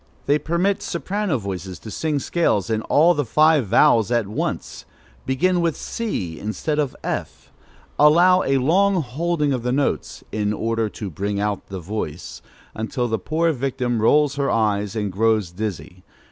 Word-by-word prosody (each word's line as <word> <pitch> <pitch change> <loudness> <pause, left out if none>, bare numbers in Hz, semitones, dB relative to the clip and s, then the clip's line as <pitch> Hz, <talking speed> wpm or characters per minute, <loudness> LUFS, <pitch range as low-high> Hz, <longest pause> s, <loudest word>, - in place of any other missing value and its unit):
They 145 +2 +3
permit 175 +6 0
soprano 190 -2 -2
voices 95 -4 -6
to 110 - -10
sing 155 +3 -1
scales 120 - 0
in 110 -1 0
all 160 +9 +4
the 145 - 0
five 150 0 +3
vowels 110 0 +4
at 120 -3 +1
once; 105 - -4 0.4
begin 175 +7 +2
with 165 -2 0
c 100 - -4
instead 150 +8 -2
of 145 -4 -1
f; 65 +2 -5 0.5
allow 175 +5 +6
a 135 0 +1
long 180 +6 +2
holding 150 +2 -1
of 125 - -2
the 125 +1 -1
notes, 140 +2 -1
"in 105 -1 -1
order 115 0 -1
to 100 0 -7
bring 100 +5 -3
out 105 -1 -2
the 95 -1 -6
voice," 90 -3 -6 0.3
until 115 +3 -2
the 110 -2 -1
poor 160 - 0
victim 125 -4 -2
rolls 145 +4 +3
her 140 -1 0
eyes 105 -2 0
and 105 -3 -2
grows 105 -2 +1
dizzy. 95 -2 -6
120 Hz, 160 wpm, -22 LUFS, 105-155 Hz, 0.5 s, allow